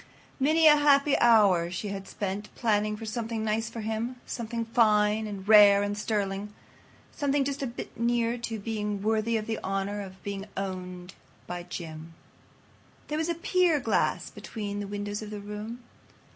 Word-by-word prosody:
Many 310 Hz, +4 st, +3 dB
a 300 Hz, -1 st, +8 dB
happy 285 Hz, -1 st, +4 dB
hour 200 Hz, -8 st, +5 dB
she 185 Hz, +4 st, -4 dB
had 195 Hz, -1 st, -6 dB
spent 205 Hz, +1 st, -4 dB
planning 210 Hz, -2 st, +1 dB
for 225 Hz, -, -7 dB
something 225 Hz, 0 st, -3 dB
nice 220 Hz, +1 st, -1 dB
for 230 Hz, -, -6 dB
him. 225 Hz, +3 st, -3 dB
Something 230 Hz, 0 st, -4 dB
fine 215 Hz, -2 st, +3 dB
and 200 Hz, -2 st, -7 dB
rare 205 Hz, -2 st, +8 dB
and 205 Hz, 0 st, -2 dB
sterling—something 210 Hz, +7 st, -3 dB
just 280 Hz, +1 st, -3 dB
a -, -, 0 dB
little 240 Hz, -1 st, -7 dB
bit -, -, -7 dB
near 235 Hz, 0 st, +1 dB
to 230 Hz, -1 st, -4 dB
being 210 Hz, -1 st, -3 dB
worthy 220 Hz, +1 st, +1 dB
of 215 Hz, -, -3 dB
the 225 Hz, 0 st, -3 dB
honor 195 Hz, +1 st, -2 dB
of 190 Hz, -1 st, -10 dB
being 200 Hz, 0 st, -5 dB
owned 185 Hz, -1 st, -5 dB, 0.3 s
by 175 Hz, 0 st, -5 dB
Jim. 165 Hz, -2 st, -8 dB, 0.9 s
There 300 Hz, -, -1 dB
was 320 Hz, +1 st, -1 dB
a 340 Hz, -, 0 dB
pier 345 Hz, -2 st, +2 dB
glass 230 Hz, -4 st, 0 dB
between 205 Hz, -2 st, -5 dB
the 205 Hz, -, -4 dB
windows 205 Hz, +1 st, -4 dB
of 215 Hz, -, -7 dB
the 210 Hz, -1 st, -6 dB
room. 210 Hz, +4 st, -7 dB
215 Hz, 170 wpm, -28 LUFS, 200-235 Hz, 0.9 s, a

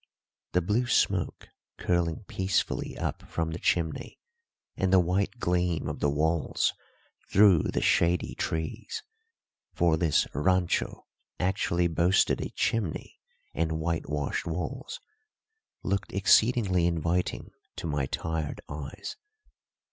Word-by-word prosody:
The 90 Hz, -, +2 dB
blue 110 Hz, +7 st, +1 dB
smoke 95 Hz, -7 st, +1 dB, 0.3 s
curling 85 Hz, +1 st, 0 dB
peacefully 95 Hz, 0 st, -1 dB
up -, -, -3 dB
from 80 Hz, -1 st, -2 dB
the 80 Hz, -, -5 dB
chimney 80 Hz, -3 st, -1 dB, 0.6 s
and 95 Hz, -1 st, 0 dB
the 95 Hz, -, +7 dB
white 95 Hz, +6 st, 0 dB
gleam 90 Hz, -, 0 dB
of -, -, -4 dB
the 75 Hz, -, +2 dB
walls 80 Hz, +2 st, +1 dB, 0.6 s
through 100 Hz, -5 st, +6 dB
the -, -, -1 dB
shady 85 Hz, 0 st, +2 dB
trees 80 Hz, +8 st, -3 dB, 0.7 s
for 85 Hz, -2 st, +3 dB
this 80 Hz, -3 st, +3 dB
rancho 90 Hz, +5 st, +1 dB, 0.3 s
actually 90 Hz, -1 st, +1 dB
boasted 85 Hz, +3 st, +2 dB
a -, -, -3 dB
chimney 105 Hz, -9 st, -2 dB, 0.3 s
and 80 Hz, -1 st, 0 dB
whitewashed 80 Hz, -3 st, -2 dB
walls 90 Hz, -, -4 dB, 0.8 s
looked 100 Hz, 0 st, -1 dB
exceedingly 100 Hz, -2 st, +4 dB
inviting 85 Hz, +1 st, -1 dB, 0.2 s
to -, -, -6 dB
my 75 Hz, -4 st, -1 dB
tired 80 Hz, -3 st, -3 dB
eyes. 70 Hz, 0 st, -7 dB
85 Hz, 110 wpm, -28 LUFS, 80-95 Hz, 0.8 s, the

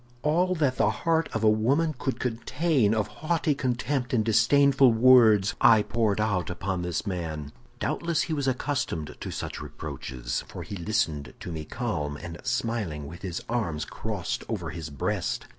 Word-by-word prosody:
"All 180 Hz, +5 st, +2 dB
that 145 Hz, -6 st, +1 dB
the 105 Hz, -, +3 dB
heart 165 Hz, +8 st, 0 dB
of 110 Hz, -, -2 dB
a -, -, +5 dB
woman 135 Hz, +10 st, +3 dB
could 130 Hz, +1 st, -3 dB
contain 125 Hz, 0 st, +1 dB
of 105 Hz, -2 st, +1 dB
haughty 155 Hz, -, -1 dB
contempt 130 Hz, 0 st, -1 dB
and 110 Hz, -2 st, +2 dB
disdainful 135 Hz, +4 st, +5 dB
words, 110 Hz, -4 st, +6 dB
I 115 Hz, -5 st, +7 dB
poured 110 Hz, -3 st, 0 dB
out 105 Hz, -5 st, 0 dB
upon 90 Hz, 0 st, -2 dB
this 90 Hz, +2 st, -2 dB
man. 80 Hz, -6 st, -4 dB, 0.3 s
Doubtless 170 Hz, -1 st, 0 dB
he 160 Hz, -, -3 dB
was 140 Hz, -3 st, -1 dB
accustomed 130 Hz, -, -2 dB
to -, -, -5 dB
such -, -, -5 dB
reproaches, -, -, -5 dB
for -, -, -7 dB
he 100 Hz, -, -7 dB
listened 80 Hz, -6 st, -1 dB
to 90 Hz, -, -6 dB
me 80 Hz, -2 st, -5 dB
calm 75 Hz, -, -3 dB
and 85 Hz, +2 st, -8 dB
smiling, 100 Hz, -11 st, -2 dB
with 85 Hz, +5 st, -9 dB
his 90 Hz, -4 st, -4 dB
arms 85 Hz, -11 st, -1 dB
crossed -, -, -4 dB
over -, -, -3 dB
his 80 Hz, -1 st, -6 dB
breast. 70 Hz, -2 st, -2 dB
110 Hz, 165 wpm, -27 LUFS, 85-135 Hz, 0.3 s, I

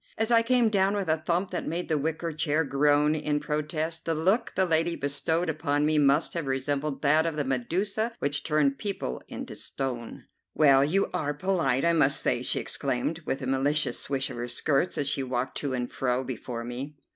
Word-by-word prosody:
As 225 Hz, +2 st, 0 dB
I 230 Hz, -1 st, +6 dB
came 240 Hz, -1 st, +3 dB
down 195 Hz, -1 st, +2 dB
with 200 Hz, -3 st, -2 dB
a 160 Hz, -, +3 dB
thump 170 Hz, +4 st, -1 dB
that -, -, -3 dB
made 170 Hz, +3 st, -3 dB
the 160 Hz, -, +1 dB
wicker 160 Hz, +3 st, -2 dB
chair 150 Hz, +1 st, 0 dB
groan 145 Hz, +1 st, +3 dB
in 150 Hz, -1 st, -1 dB
protest, 155 Hz, +2 st, -3 dB
the 165 Hz, -, 0 dB
look 190 Hz, +9 st, +1 dB
the 190 Hz, -, +3 dB
lady 165 Hz, 0 st, +1 dB
bestowed 160 Hz, +5 st, -1 dB
upon 150 Hz, -2 st, 0 dB
me 155 Hz, 0 st, +2 dB
must 145 Hz, +2 st, +3 dB
have 165 Hz, -5 st, -3 dB
resembled 140 Hz, +2 st, -2 dB
that 155 Hz, +3 st, +4 dB
of 165 Hz, -, -2 dB
the 150 Hz, -, -1 dB
Medusa 185 Hz, -, -1 dB
which 145 Hz, 0 st, -1 dB
turned 145 Hz, -3 st, +1 dB
people 190 Hz, -, -4 dB
into -, -, -7 dB
stone. 125 Hz, -4 st, -5 dB, 0.3 s
"Well, 140 Hz, -3 st, +5 dB
you 180 Hz, +7 st, +1 dB
are 145 Hz, -1 st, -1 dB
polite, 155 Hz, -6 st, 0 dB
I 170 Hz, -, +4 dB
must 140 Hz, -4 st, +6 dB
say," -, -, 0 dB
she -, -, 0 dB
exclaimed, 125 Hz, +7 st, -1 dB
with 135 Hz, 0 st, -2 dB
a -, -, -2 dB
malicious 140 Hz, +3 st, +1 dB
swish 135 Hz, -1 st, -2 dB
of -, -, -7 dB
her 120 Hz, +1 st, -3 dB
skirts 135 Hz, +6 st, 0 dB
as 140 Hz, -, 0 dB
she 140 Hz, -1 st, 0 dB
walked 130 Hz, -1 st, -3 dB
to 140 Hz, -3 st, -2 dB
and 125 Hz, -1 st, -3 dB
fro 125 Hz, 0 st, -1 dB
before 120 Hz, -1 st, -5 dB
me. 130 Hz, +5 st, -6 dB
150 Hz, 205 wpm, -27 LUFS, 135-165 Hz, 0.3 s, I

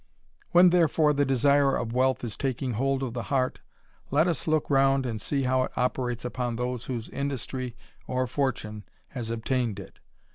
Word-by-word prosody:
When 175 Hz, 0 st, +6 dB
therefore 160 Hz, -3 st, +3 dB
the 145 Hz, 0 st, +2 dB
desire 140 Hz, +1 st, +3 dB
of 115 Hz, -, -3 dB
wealth 130 Hz, 0 st, +2 dB
is 115 Hz, -3 st, -4 dB
taking 130 Hz, -1 st, -2 dB
hold 135 Hz, +4 st, 0 dB
of 125 Hz, -3 st, -3 dB
the 120 Hz, -, -3 dB
heart, 130 Hz, -2 st, 0 dB, 0.5 s
let 155 Hz, +5 st, +3 dB
us 165 Hz, -5 st, -2 dB
look 155 Hz, -1 st, +1 dB
round 135 Hz, -1 st, +3 dB
and 110 Hz, -3 st, -3 dB
see 140 Hz, -2 st, 0 dB
how 130 Hz, 0 st, +2 dB
it 130 Hz, -, -2 dB
operates 125 Hz, -1 st, -1 dB
upon 125 Hz, -1 st, -2 dB
those 125 Hz, 0 st, -3 dB
whose 120 Hz, -3 st, -4 dB
industry 130 Hz, -3 st, -4 dB, 0.3 s
or 130 Hz, 0 st, 0 dB
fortune 115 Hz, -5 st, -2 dB, 0.3 s
has 120 Hz, -4 st, -5 dB
obtained 115 Hz, -2 st, -1 dB
it 100 Hz, -, -12 dB
130 Hz, 175 wpm, -27 LUFS, 120-140 Hz, 0.5 s, When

